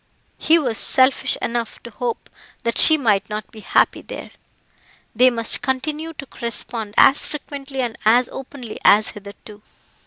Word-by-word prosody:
He 325 Hz, -, +3 dB
was 245 Hz, -9 st, -1 dB
selfish 260 Hz, +1 st, +3 dB
enough 235 Hz, -1 st, -3 dB
to 235 Hz, -, -10 dB
hope 235 Hz, +2 st, -5 dB, 0.4 s
that 235 Hz, -, 0 dB
she 315 Hz, -, +8 dB
might 210 Hz, -7 st, 0 dB
not 210 Hz, -1 st, -6 dB
be 220 Hz, -, -13 dB
happy -, -, +1 dB
there. -, -, -10 dB, 0.8 s
They 250 Hz, +3 st, +5 dB
must 230 Hz, -2 st, +1 dB
continue 300 Hz, +5 st, -3 dB
to 285 Hz, -3 st, -9 dB
correspond 230 Hz, -3 st, -4 dB
as 275 Hz, -, +5 dB
frequently 280 Hz, -2 st, -7 dB
and 235 Hz, -2 st, -3 dB
as 235 Hz, +3 st, +4 dB
openly 260 Hz, -4 st, -9 dB
as 210 Hz, +1 st, +5 dB
hitherto. 205 Hz, +1 st, -13 dB
240 Hz, 150 wpm, -20 LUFS, 215-270 Hz, 0.8 s, she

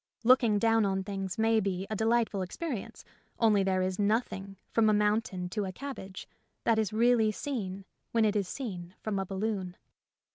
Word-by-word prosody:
Looking 235 Hz, -3 st, +5 dB
down 225 Hz, +1 st, +3 dB
on 195 Hz, -1 st, 0 dB
things 195 Hz, -2 st, -4 dB
may 225 Hz, 0 st, +3 dB
be 190 Hz, -2 st, -2 dB
a -, -, 0 dB
delightful 220 Hz, -2 st, +1 dB
experience, 230 Hz, -, -5 dB, 0.3 s
only 215 Hz, -3 st, +4 dB
there 190 Hz, -1 st, +1 dB
is 185 Hz, +1 st, -2 dB
nothing, 200 Hz, -2 st, -1 dB
from 225 Hz, -1 st, +4 dB
a -, -, +4 dB
mountain 210 Hz, -3 st, +1 dB
to 205 Hz, +2 st, -2 dB
a 190 Hz, -, -4 dB
cabbage, 195 Hz, -5 st, -7 dB, 0.4 s
that 225 Hz, -1 st, +3 dB
is 215 Hz, -3 st, 0 dB
really 225 Hz, 0 st, +3 dB
seen 200 Hz, -6 st, -4 dB, 0.3 s
when 225 Hz, -1 st, +3 dB
it 210 Hz, 0 st, +1 dB
is 200 Hz, -3 st, 0 dB
seen 185 Hz, -7 st, -6 dB
from 210 Hz, -3 st, -1 dB
a 195 Hz, -, -3 dB
balloon. 195 Hz, -2 st, -3 dB
210 Hz, 175 wpm, -30 LUFS, 190-225 Hz, 0.4 s, Looking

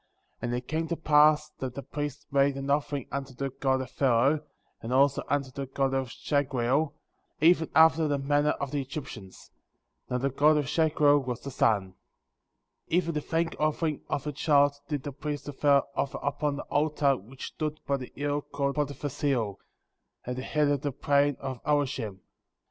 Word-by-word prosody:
And 120 Hz, -, -2 dB
it 125 Hz, 0 st, -5 dB
came 160 Hz, +1 st, -1 dB
to 170 Hz, -, -1 dB
pass 150 Hz, -1 st, +4 dB
that 130 Hz, -2 st, -4 dB
the 140 Hz, -, -5 dB
priest 145 Hz, -1 st, -5 dB
made 140 Hz, 0 st, +3 dB
an 135 Hz, +1 st, -2 dB
offering 145 Hz, -2 st, -1 dB
unto 135 Hz, -2 st, -5 dB
the 135 Hz, +1 st, -3 dB
god 130 Hz, 0 st, 0 dB
of 130 Hz, -1 st, -7 dB
Pharaoh,^ 135 Hz, +3 st, +3 dB, 0.4 s
and 115 Hz, -, -5 dB
also 140 Hz, +2 st, +3 dB
unto 140 Hz, -2 st, -1 dB
the 140 Hz, +1 st, -5 dB
god 135 Hz, 0 st, 0 dB
of 135 Hz, -1 st, 0 dB
Shagreel, 140 Hz, +2 st, 0 dB, 0.5 s
even 160 Hz, 0 st, +4 dB
after 160 Hz, 0 st, +6 dB
the 145 Hz, -1 st, +1 dB
manner 145 Hz, +2 st, +1 dB
of 140 Hz, -2 st, -3 dB
the 145 Hz, -1 st, -1 dB
Egyptians. 130 Hz, -8 st, -8 dB, 0.6 s
Now 125 Hz, -, 0 dB
the 135 Hz, +2 st, -1 dB
god 150 Hz, +3 st, +4 dB
of 145 Hz, -, +1 dB
Shagreel 150 Hz, -1 st, +3 dB
was 125 Hz, -3 st, -4 dB
the 140 Hz, -, -6 dB
sun. 105 Hz, -6 st, +2 dB, 1.0 s
10. 165 Hz, -, +2 dB
Even 170 Hz, -2 st, 0 dB
the 150 Hz, -, -1 dB
thank 165 Hz, +2 st, -1 dB
offering 155 Hz, 0 st, 0 dB
of 140 Hz, -, -2 dB
a 150 Hz, -, -2 dB
child 145 Hz, -1 st, +3 dB
did 145 Hz, -4 st, -3 dB
the 145 Hz, -, -4 dB
priest 145 Hz, +1 st, -5 dB
of 145 Hz, -2 st, -8 dB
Pharaoh 140 Hz, -1 st, +4 dB
offer 140 Hz, -, -1 dB
upon 145 Hz, +1 st, -1 dB
the 140 Hz, -, -5 dB
altar 145 Hz, -2 st, +1 dB
which 125 Hz, +4 st, -9 dB
stood 155 Hz, -1 st, -3 dB
by 140 Hz, -, +1 dB
the 130 Hz, -2 st, -8 dB
hill 145 Hz, +1 st, -1 dB
called 140 Hz, 0 st, -3 dB
Potiphar^s 145 Hz, 0 st, -3 dB
Hill,« 120 Hz, -9 st, 0 dB, 0.7 s
at 125 Hz, -, -3 dB
the 130 Hz, -, -4 dB
head 150 Hz, +2 st, +1 dB
of 145 Hz, -2 st, +1 dB
the 145 Hz, -, -1 dB
plain 140 Hz, +1 st, +2 dB
of 130 Hz, -3 st, -5 dB
Olishem. 130 Hz, -9 st, -1 dB
140 Hz, 190 wpm, -28 LUFS, 135-150 Hz, 1.0 s, after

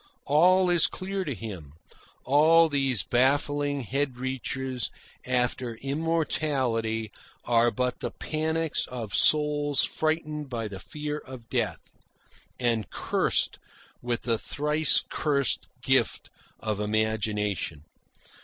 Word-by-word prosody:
All 180 Hz, +5 st, +4 dB
is 175 Hz, -2 st, +5 dB
clear 190 Hz, +1 st, -4 dB
to 140 Hz, -5 st, -3 dB
him. 95 Hz, -10 st, -8 dB, 0.5 s
All 160 Hz, +4 st, +5 dB
these 135 Hz, -, +1 dB
baffling 145 Hz, +4 st, +1 dB
head 135 Hz, +2 st, -2 dB
reaches 130 Hz, -1 st, -3 dB, 0.4 s
after 125 Hz, -1 st, 0 dB
immortality 135 Hz, -6 st, -1 dB, 0.3 s
are 120 Hz, 0 st, +4 dB
but 125 Hz, +1 st, -2 dB
the -, -, -3 dB
panics 160 Hz, 0 st, -2 dB
of 115 Hz, -5 st, -6 dB
souls 145 Hz, -2 st, +3 dB
frightened 155 Hz, -2 st, -1 dB
by 115 Hz, -3 st, -3 dB
the 100 Hz, -2 st, -8 dB
fear 150 Hz, +5 st, -5 dB
of 130 Hz, -5 st, -12 dB
death, -, -, -1 dB, 0.8 s
and 115 Hz, -4 st, 0 dB
cursed -, -, +1 dB, 0.4 s
with 120 Hz, -1 st, -2 dB
the 115 Hz, -2 st, 0 dB
thrice 150 Hz, +2 st, +2 dB
cursed 140 Hz, -5 st, 0 dB, 0.2 s
gift -, -, +1 dB, 0.3 s
of 110 Hz, -2 st, -3 dB
imagination. 105 Hz, -6 st, -1 dB
130 Hz, 105 wpm, -27 LUFS, 115-150 Hz, 0.8 s, is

